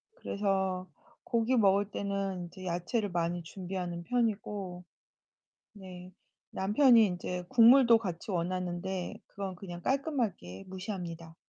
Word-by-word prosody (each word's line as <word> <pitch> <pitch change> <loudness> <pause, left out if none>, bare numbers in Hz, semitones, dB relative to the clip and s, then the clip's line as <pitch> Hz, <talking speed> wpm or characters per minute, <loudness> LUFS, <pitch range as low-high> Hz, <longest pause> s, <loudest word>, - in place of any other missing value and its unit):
그래서 190 - -1 0.4
고기 235 +2 +1
먹을 200 -2 +3
때는 195 -2 -2
인제 185 +2 -11
야채를 180 +5 -1
많이 175 0 -1
준비하는 180 0 -5
편이고. 205 -5 -2 0.9
네, 185 -2 -11 0.4
남편이 225 +4 +5
인제 180 -1 -4
국물도 235 +1 +7
같이 185 -3 -5
원하는데 180 0 -2
그건 195 -2 -5
그냥 175 -1 -8
깔끔하게 235 - -2
무시합니다. 180 -4 -6
190 Hz, 265 characters per minute, -31 LUFS, 175-210 Hz, 0.9 s, 국물도